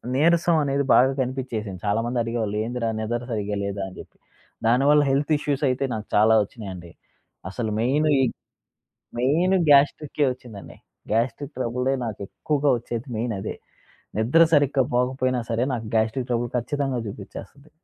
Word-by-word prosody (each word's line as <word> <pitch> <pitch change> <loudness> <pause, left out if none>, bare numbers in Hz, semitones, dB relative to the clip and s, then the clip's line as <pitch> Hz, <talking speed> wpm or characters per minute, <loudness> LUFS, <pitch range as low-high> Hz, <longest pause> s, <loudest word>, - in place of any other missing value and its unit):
నీరసం 170 +3 +3
అనేది 140 0 0
బాగా 130 +2 +5
కనిపిచ్చేసింది. 120 -7 -3
చాలా 105 +2 +1
మంది 120 +1 -2
అడిగేవాళ్ళు, 115 -3 -2
"ఏందిరా 120 0 -3
నిద్ర 120 +2 -2
సరిగ్గా 105 -2 -2
లేదా" 100 0 -3
అని 95 - -11
జెప్పి. - - -12 0.5
దానివల్ల 140 +5 +4
హెల్త్ 145 +3 +1
ఇష్యూస్ 145 -1 -2
అయితే 130 +2 -1
నాకు 110 -1 -4
చాలా 110 +2 +5
ఒచ్చినాయండి. 95 -6 -9 0.6
అసలు 110 +2 -3
మెయిన్ 140 +6 +2
ఈ - - +4 1.0
మెయిన్ 165 +9 +2
గ్యాస్ట్రికే 145 +1 +3
ఒచ్చిందండి. 115 -6 -12 0.3
గ్యాస్ట్రిక్ 120 +6 -1
ట్రబులే 125 +2 -1
నాకెక్కువగా 140 +8 -2
వచ్చేది 115 +1 -6
మెయిన్ 115 0 -1
అదే. - - -5 0.6
నిద్ర 125 +10 +4
సరిగ్గా 145 -2 +4
పోకపోయినా 130 0 +1
సరే 115 +2 +1
నాకు 115 -2 -4
గ్యాస్ట్రిక్ 110 +3 0
ట్రబుల్ 120 0 0
ఖచ్చితంగా 135 0 -2
చూపిచ్చేస్తది. 105 +8 -10
125 Hz, 140 wpm, -24 LUFS, 110-140 Hz, 1.0 s, బాగా